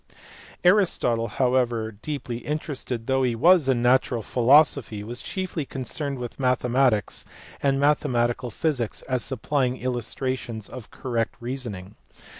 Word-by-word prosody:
Aristotle 175 - +3
however, 120 -2 +1
deeply 120 +2 -5
interested 140 -5 -4
though 130 +1 +1
he 125 -3 +1
was 165 +2 +5
in 120 -2 +2
natural 125 -2 +3
philosophy, 130 -4 +3
was 120 +3 -7
chiefly 185 -4 -3
concerned 140 +1 -4
with 120 +1 -7
mathematics 125 -3 +1 0.4
and 135 -1 +2
mathematical 125 -4 +1
physics 130 -4 -2
as 130 -3 -1
supplying 130 0 -1
illus 125 -3 -3
trations 125 -5 -3
of 125 -4 -10
correct 120 -3 -2
reasoning. 120 -6 -6
125 Hz, 120 wpm, -25 LUFS, 120-140 Hz, 0.4 s, was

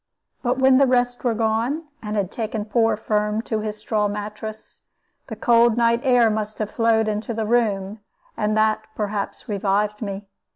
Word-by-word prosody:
But 250 0 0
when 265 0 +5
the 275 - +5
rest 245 -1 +1
were 240 -3 +1
gone, 230 +7 0 0.2
and 210 -1 -4
had 195 -3 -1
taken 220 -2 -3
poor 225 0 +2
Firm 210 0 -1
to 220 -2 -2
his 215 0 -4
straw 210 -1 0
mattress, 210 +1 -7 0.5
the - - -6
cold 235 -1 +4
night 235 0 +3
air 245 -4 +4
must 215 0 -3
have 215 -1 -3
flowed 225 -1 +2
into 215 +2 -2
the 220 -1 -1
room, 210 -3 0 0.4
and 215 0 0
that, 215 0 +1
perhaps, 205 -1 -4
revived 205 +1 0
me. 200 -1 -5
220 Hz, 170 wpm, -22 LUFS, 210-235 Hz, 0.5 s, when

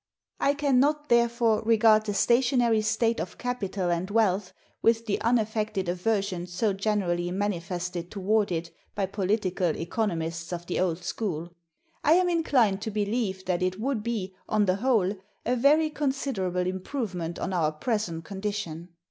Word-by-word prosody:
I 280 - +2
can 280 -3 +2
not, 295 +2 +1
therefore, 235 -2 +3
regard 220 -1 +4
the 205 - -1
stationary 240 0 +3
state 225 +2 +1
of - - -5
capital 200 -7 -2
and 175 +2 -1
wealth 205 -3 +1 0.3
with 230 0 +3
the 210 - -1
unaffected 215 -4 0
aversion 185 0 -1
so 190 +4 0
generally 190 -4 0
manifested 180 -2 -3
toward 205 +1 +1
it 165 0 -3 0.2
by 200 - 0
political 190 -3 0
economists 165 -3 -2
of 175 -1 -4
the 175 - -2
old 175 -1 0
school. 175 -4 -3 0.5
I 305 - +5
am 360 +1 +4
inclined 255 - +2
to 220 - -3
believe 205 -2 -2
that 180 -1 0
it 185 +1 -1
would 250 -1 -1
be, 210 -4 -3 0.2
on 215 -1 +3
the 185 0 +1
whole, 215 -5 +2 0.3
a 245 - +2
very 300 +5 +4
considerable 265 -12 -1
improvement 185 - -3
on 190 - -3
our 160 -4 +2
present 170 -1 -2
condition. 190 -4 -4
205 Hz, 150 wpm, -27 LUFS, 180-230 Hz, 0.5 s, I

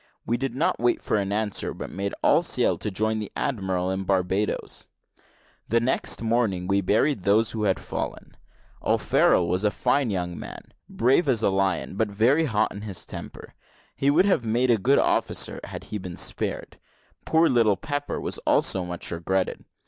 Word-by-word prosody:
We 120 - 0
did 125 0 -3
not 150 - 0
wait 120 +1 +2
for - - -1
an 100 -1 -1
answer, 105 0 -1
but - - -7
made 100 +1 -3
all - - +5
sail - - +1
to - - -2
join 110 +2 0
the 105 - -6
admiral 95 -6 -1
at 95 0 -3
Barbadoes. 95 +2 -1 0.8
The 115 - +2
next 120 -1 0
morning 110 -6 +1
we 100 +1 +1
buried 105 +5 +1
those 105 +4 +3
who 110 -2 -2
had 95 -2 +1
fallen. - - -6 0.5
O'Farrel 85 - +3
was 90 +3 0
a 105 - +4
fine 125 +4 +1
young 90 -3 -3
man, - - -10 0.2
brave 130 +7 +2
as 120 -5 +2
a - - +3
lion, 95 -1 -1
but 110 - +2
very 120 +10 +3
hot 110 -5 0
in 100 - -8
his 100 -4 -5
temper. - - -9 0.4
He 140 - +1
would 165 +7 +4
have 190 -11 +2
made 120 +3 +2
a 115 - +3
good 135 +7 +3
officer - - 0
had - - -8
he 105 - -5
been 90 -1 -7
spared. - - -3 0.4
Poor 160 +1 +3
little 115 -7 +3
Pepper 145 - -3
was - - -3
also 95 - +2
much 90 -1 -5
regretted. 90 +3 -2
105 Hz, 180 wpm, -25 LUFS, 95-120 Hz, 0.8 s, all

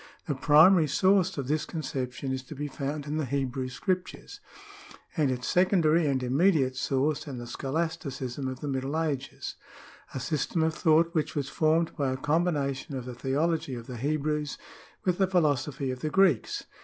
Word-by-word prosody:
The 150 - -1
primary 155 +5 +6
source 190 +5 +3
of 135 -3 -3
this 150 +2 0
conception 130 -4 -4
is 130 0 -2
to 150 - -9
be 145 +2 -3
found 145 +1 -4
in 150 +1 -3
the 155 - 0
Hebrew 130 -1 -2
scriptures, 185 +8 -3 0.8
and 150 -5 +2
its 125 -1 -2
secondary 170 -3 +3
and 135 -2 0
immediate 135 0 +2
source 135 +4 0
in 135 -3 -5
the 120 - -6
scholasticism 135 -2 -3
of 130 -1 -5
the 150 - -4
Middle 135 +3 -1
Ages 150 -5 -3 0.3
— - - -19
a - - -2
system 155 +4 -1
of 160 0 +1
thought 165 0 +3
which 155 -2 -1
was 140 -2 -2
formed 160 +1 +1
by 140 -3 0
a 130 - -2
combination 145 -2 0
of 125 - -6
the 125 - -6
theology 140 +3 -1
of 120 -1 -7
the 125 -1 -7
Hebrews 150 +2 -1 0.5
with 180 -1 +1
the 190 - +4
philosophy 150 -6 +1
of 130 - -5
the 155 - -2
Greeks. 180 - +2
145 Hz, 180 wpm, -28 LUFS, 130-160 Hz, 0.8 s, primary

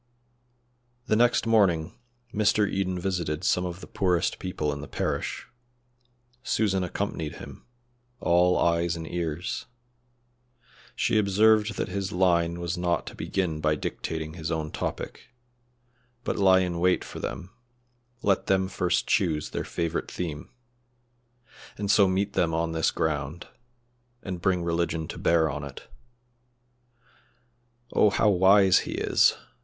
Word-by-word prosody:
The 110 - +2
next 120 +1 +3
morning 95 -7 +2 0.4
Mr. 105 -1 +3
Eden 95 -2 -1
visited 85 -5 -2
some 90 - +2
of 90 +1 -7
the - - -8
poorest 90 -3 0
people 75 -5 -2
in 70 - -6
the 75 - -8
parish. - - -3 1.0
Susan 95 -6 0
accompanied 90 -4 -3
him, - - -11 0.5
all 90 +1 +3
eyes 85 0 +1
and 80 -1 -6
ears. 85 +1 -3 1.3
She 110 - +2
observed 105 +1 +3
that - - -2
his 95 0 -3
line 85 -2 +2
was 85 +1 -3
not 90 -1 0
to - - -9
begin 90 -5 -2
by 75 0 +2
dictating 80 +2 -4
his 80 -2 -5
own 80 -2 -2
topic, 120 - -6 0.9
but - - -1
lie 95 -1 +5
in 90 -2 -2
wait 90 +1 +2
for - - -8
them; 90 - -6 0.7
let 100 -2 +1
them 95 -1 +2
first 90 -3 0
choose 80 -8 0
their - - -3
favorite 85 -1 -3
theme, 80 -4 -5 1.3
and 100 -1 0
so 100 -2 +5
meet 100 +2 0
them 80 -4 +1
on 80 0 0
this 80 -1 +1
ground, 80 +1 -3 0.7
and 90 -3 -5
bring 90 -2 +1
religion 85 -1 -1
to - - -7
bear 85 -1 +3
on 75 -1 -4
it. 70 -2 -9 2.1
"Oh, 105 - +5
how 105 +1 +2
wise 95 +1 +5
he - - -5
is!" - - +3
90 Hz, 135 wpm, -26 LUFS, 80-95 Hz, 2.1 s, lie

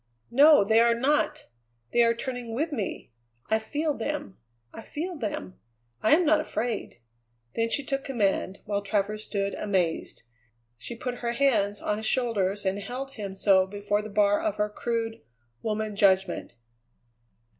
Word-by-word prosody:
"No, 290 0 +7
they 220 +3 +4
are 235 0 +5
not! 280 +5 +1 0.5
They 240 - +5
are 230 0 +4
turning 245 -2 -5
with 310 +6 -1
me. 210 - -4 0.4
I 220 - +4
feel 295 +7 -1
them; 275 -5 -4 0.3
I - - -8
feel 340 +10 -5
them. 300 - -5 0.4
I 220 - +6
am 350 +2 +2
not 310 0 +5
afraid." 230 -5 -3 0.6
Then 230 0 0
she 285 - -1
took 275 0 -2
command, 200 -6 -1
while 205 -1 -1
Travers 210 +1 -1
stood 200 -1 -2
amazed. 185 -5 -1 0.6
She 235 - -7
put 245 +1 -4
her 235 -1 -2
hands 215 -6 +2
on 210 - 0
his 220 0 -3
shoulders 205 -6 0
and 190 +1 0
held 255 +6 -5
him 200 -6 -6
so 190 -1 +4
before 205 +1 -1
the 215 - -8
bar 205 0 +3
of 320 -2 -1
her 210 0 0
crude, 230 +1 -3 0.4
woman 215 -1 -2
judgment. 190 -7 +2
220 Hz, 155 wpm, -27 LUFS, 205-260 Hz, 0.6 s, No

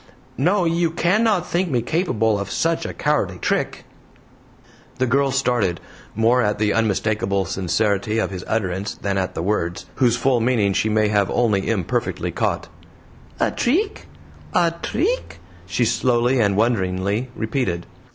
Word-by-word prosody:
no! 180 +6 +2
You 170 0 +1
cannot 185 +4 +2
think 180 +1 0
me 125 -5 0
capable 115 - +1
of 100 0 -4
such 165 0 0
a - - -5
cowardly 125 -12 0
trick?" - - -2 1.1
The 130 - +1
girl 140 +3 +2
started, 125 -10 +1 0.4
more 115 +3 +3
at 105 -2 0
the 105 -1 +1
unmistakable 105 -3 0
sincerity 100 +3 0
of 110 - 0
his 90 -2 -6
utterance 100 -2 -2
than 100 -1 -2
at 95 - -3
the 80 - -2
words, 90 -2 -1
whose 120 -2 +3
full 125 0 +2
meaning 110 -5 +2
she 110 - +1
may 110 0 +2
have 100 -2 +2
only 105 -5 +1
imperfectly 100 -7 -1
caught. - - -1 0.7
"A - - +2
treek? 395 - 0 0.5
A 170 -2 +4
treek?" 480 +8 -1 0.3
she - - +1
slowly 125 0 +2
and 100 -3 +2
wonderingly 105 +1 0
repeated. 110 -7 -2
115 Hz, 145 wpm, -21 LUFS, 100-135 Hz, 1.1 s, A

